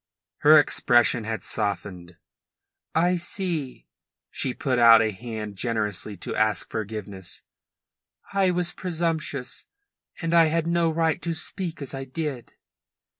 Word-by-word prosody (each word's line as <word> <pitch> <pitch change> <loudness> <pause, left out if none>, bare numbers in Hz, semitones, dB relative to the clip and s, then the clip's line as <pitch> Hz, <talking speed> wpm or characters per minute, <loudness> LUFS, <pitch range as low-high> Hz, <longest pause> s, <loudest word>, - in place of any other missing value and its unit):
Her 155 +1 +7
expression 120 -5 +3
had 110 0 -4
softened. 90 -4 -3 0.8
"I 175 +3 +3
see." 170 -6 -2 0.5
She 130 - -1
put 125 0 -1
out 115 -1 +8
a 110 -1 +1
hand 105 -1 -7
generously 105 -3 -2
to - - -4
ask 110 -3 +1
forgiveness. 105 -3 -5 0.9
"I 195 -1 +3
was 180 -1 0
presumptuous, 160 -7 -3 0.5
and 165 0 -2
I 165 -1 +7
had 160 +1 0
no 170 0 +2
right 160 +1 0
to 170 - -2
speak 170 -1 -4
as 140 - -6
I 135 0 -5
did." 135 -2 -5
135 Hz, 125 wpm, -25 LUFS, 110-165 Hz, 0.9 s, out